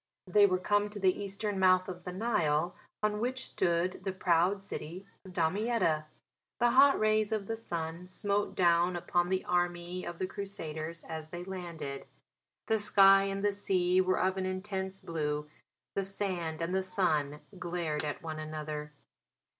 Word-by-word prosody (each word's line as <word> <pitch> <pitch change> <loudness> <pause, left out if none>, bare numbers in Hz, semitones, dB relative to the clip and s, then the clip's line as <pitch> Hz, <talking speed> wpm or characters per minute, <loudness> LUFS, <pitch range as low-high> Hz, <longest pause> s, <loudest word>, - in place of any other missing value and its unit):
They 205 +2 +5
were 185 -1 +2
come 205 +3 +1
to 205 0 -7
the 190 -2 +4
eastern 200 0 -3
mouth 185 -1 +5
of 180 -2 -7
the 180 - -4
Nile, 175 -6 +1 0.3
on 210 0 +1
which 255 +3 -2
stood 175 +1 0
the 195 - -1
proud 185 +1 +2
city 185 -1 -7 0.2
of 190 -2 -12
Damietta. 175 -2 +1 0.5
The 240 0 +4
hot 275 +2 +6
rays 215 0 +2
of 215 -2 -1
the 225 - -2
sun 170 -4 -5
smote 205 +1 -1
down 175 0 +3
upon 175 0 0
the 190 0 0
army 175 0 -1
of 175 - -6
the 185 - -1
Crusaders 165 -5 -5
as 160 -1 -7
they 175 +2 -6
landed. 170 -7 -6 0.6
The 220 -1 +2
sky 195 -1 +6
and 195 +1 -2
the 205 - +4
sea 185 -2 +2
were 185 0 +1
of 190 +1 +1
an 185 0 -1
intense 190 0 -4
blue; 150 -2 -2 0.5
the 195 - 0
sand 180 -5 -3
and 170 +2 -2
the 190 - +2
sun 155 -6 0 0.2
glared 170 -4 -2
at 150 +1 -4
one 155 -1 -5
another. 155 -1 -5
185 Hz, 165 wpm, -31 LUFS, 165-200 Hz, 0.6 s, hot